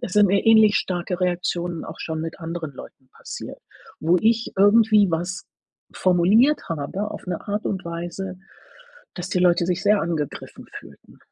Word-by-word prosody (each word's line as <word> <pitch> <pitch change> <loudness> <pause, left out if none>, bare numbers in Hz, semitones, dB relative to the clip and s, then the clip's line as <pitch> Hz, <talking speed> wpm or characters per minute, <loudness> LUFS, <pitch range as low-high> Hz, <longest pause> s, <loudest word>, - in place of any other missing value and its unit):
es 180 - -6
sind 210 -1 +5
mir 195 +1 +1
ähnlich 220 -2 +6
starke 180 0 -2
Reaktionen 175 -1 -2
auch - - -9
schon 160 -1 -4
mit 165 0 -6
anderen 165 -2 -5
Leuten 130 0 -13
passiert, - - -8 0.4
wo 170 +3 +2
ich 230 +1 +1
irgendwie 210 -1 +5
was 175 +3 -3 0.5
formuliert 195 - +3
habe 165 +7 -4
auf - - -9
'ne 180 - -3
Art 205 +1 -2
und 190 -3 -3
Weise, 175 +2 -6 0.8
dass 180 +1 -6
die 180 - 0
Leute 175 -1 +3
sich 180 +1 -1
sehr 210 0 +3
angegriffen 160 -4 -5
fühlten. - - -17
180 Hz, 160 wpm, -23 LUFS, 170-205 Hz, 0.8 s, ähnlich